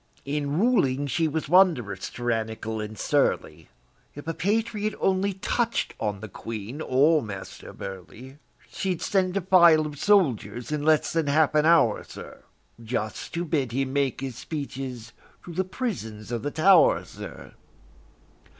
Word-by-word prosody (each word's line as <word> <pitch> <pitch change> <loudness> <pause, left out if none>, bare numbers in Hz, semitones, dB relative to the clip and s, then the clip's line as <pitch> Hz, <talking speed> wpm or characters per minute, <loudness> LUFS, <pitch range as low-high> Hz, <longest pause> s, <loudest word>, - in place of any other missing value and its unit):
In 145 +1 -2
ruling 145 - +2
she 160 +4 0
was 155 +1 -3
wonderous 155 - +3
tyrannical 110 -2 -3
and 105 0 -7
surly; - - 0 0.5
If 145 +2 -10
a 165 - -1
patriot 210 +4 -1
only 195 +1 +1
touch'd 230 +5 -1
on 105 -2 -2
the 110 - -6
Queen 115 - -7
or 150 +4 +3
Master 100 -5 -8
Burleigh, 110 +8 -9 0.3
She'd 185 -3 -3
send 190 -1 +1
a - - 0
file 170 -4 +6
of 145 -2 -7
soldiers 150 - +1
in 150 -1 -1
less 155 0 +2
than 165 -3 0
half 155 +1 +3
an 155 +1 +3
hour, 165 -10 +4
sir, - - -11 0.4
Just 110 +2 -4
to 170 +1 -1
bid 140 -7 -1
him 135 +1 -1
make 140 -2 0
his 130 -3 -5
speeches 130 -7 -6 0.3
to 175 - -8
the 185 +3 0
prisons 145 - -5
of 120 -2 -2
the 145 - -2
Tow'r, 195 - +5
sir! - - -10
145 Hz, 150 wpm, -26 LUFS, 120-175 Hz, 0.5 s, file